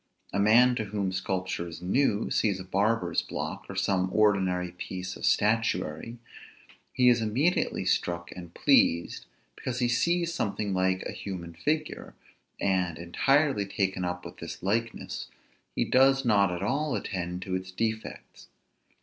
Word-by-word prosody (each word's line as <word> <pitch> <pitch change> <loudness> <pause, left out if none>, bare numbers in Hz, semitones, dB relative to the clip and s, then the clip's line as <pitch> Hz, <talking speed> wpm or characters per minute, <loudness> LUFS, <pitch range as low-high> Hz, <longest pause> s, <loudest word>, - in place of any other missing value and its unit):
A 100 - 0
man 120 +5 +6
to 110 - -2
whom 100 -2 -2
sculpture 95 -1 -2
is 80 -1 -8
new, 105 +4 +1
sees 100 -3 +1
a - - -6
barber's 105 +5 +1
block, - - -5
or - - -6
some 95 -1 +1
ordinary 95 -4 +2
piece 90 +1 -6
of - - -2
statuary; 105 -1 +1 0.7
he 125 -1 +3
is 120 -1 +5
immediately 130 +11 +1
struck 85 0 -1
and 85 -2 -9
pleased, 85 0 +2 0.3
because 125 -1 -4
he 125 -1 +2
sees 170 +7 +1
something 105 -4 -2
like 95 0 +1
a - - -4
human 90 -4 -6
figure; 150 - -3 0.4
and, 90 -4 0
entirely 135 - +2
taken 95 -2 -1
up 90 0 -3
with - - -9
this - - -8
likeness, 110 +4 -2 0.5
he - - +1
does 135 +1 +4
not 100 -4 +4
at 90 +1 -4
all 140 +6 0
attend 90 -1 -4
to 95 - -5
its 95 0 -3
defects. 110 +3 -4
100 Hz, 150 wpm, -28 LUFS, 90-115 Hz, 0.7 s, man